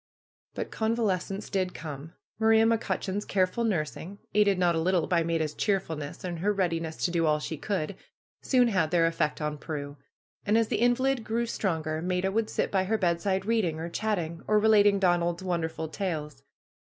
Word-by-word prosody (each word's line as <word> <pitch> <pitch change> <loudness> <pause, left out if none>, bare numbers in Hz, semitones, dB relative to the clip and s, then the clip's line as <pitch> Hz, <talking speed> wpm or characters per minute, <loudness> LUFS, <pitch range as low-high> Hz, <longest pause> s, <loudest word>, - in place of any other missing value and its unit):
But - - -4
convalescence 215 -3 -1
did 185 -2 -1
come. 150 0 -7 0.3
Maria 220 0 +5
McCutcheon's 215 -3 0
careful 190 +4 0
nursing, 185 -1 -2 0.2
aided 205 -2 +4
not 175 -1 +3
a 165 - 0
little 180 -1 +2
by 170 -2 +2
Maida's 165 -2 -1
cheerful 195 -6 0
ness 145 -1 -7
and 175 -2 -4
her 205 +5 +1
readiness 165 -5 -1
to 175 - 0
do 165 -2 +1
all 150 0 +3
she 150 +1 -4
could, 190 +2 -3 0.5
soon 250 -3 +3
had 185 -7 +1
their 165 0 +3
effect 165 -2 0
on 150 -1 -3
Prue. 145 -2 -6 0.5
And 210 +2 +2
as 230 -1 +2
the - - 0
invalid 245 +1 +2
grew 230 +2 -1
stronger 160 -8 -2
Maida 180 +2 0
would 220 +1 0
sit - - -1
by 190 -1 +1
her 220 +3 +1
bedside 190 +1 0
reading 205 -8 +1
or 165 +1 -4
chatting, 170 -5 -2
or 215 - +4
relating 205 -1 +5
Donald's 175 -2 +1
wonderful 165 -3 -2
tales. 155 -6 -4
185 Hz, 180 wpm, -28 LUFS, 165-210 Hz, 0.5 s, Maria